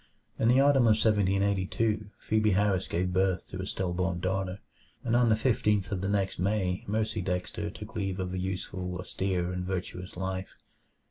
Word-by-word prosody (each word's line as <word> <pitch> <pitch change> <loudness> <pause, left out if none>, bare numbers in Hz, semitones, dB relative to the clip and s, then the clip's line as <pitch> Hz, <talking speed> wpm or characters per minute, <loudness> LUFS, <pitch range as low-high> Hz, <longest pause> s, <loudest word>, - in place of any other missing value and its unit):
In 115 - +3
the 125 +3 +5
autumn 135 -3 +5
of 110 - +6
1782 100 +1 +1
Phebe 110 0 +1
Harris 95 -1 +2
gave 90 +2 -1
birth 95 -1 +1
to 95 - -6
a 95 - -4
still 90 -2 -2
born 90 -1 -1
daughter, 95 +1 -1 0.5
and 120 -1 +1
on 120 -1 +4
the 110 - +5
fifteenth 105 -5 +1
of 95 -3 -1
the 100 - -1
next 100 -3 0
May 95 -1 0
Mercy 110 -1 0
Dexter 90 +4 -2
took 105 0 -10
leave 95 -2 -2
of 90 -1 -3
a 95 - -2
useful, 90 -1 -3
austere, 90 -1 -2
and 90 0 -3
virtuous 90 -1 -4
life. 95 +1 -4
95 Hz, 180 wpm, -29 LUFS, 90-105 Hz, 0.5 s, of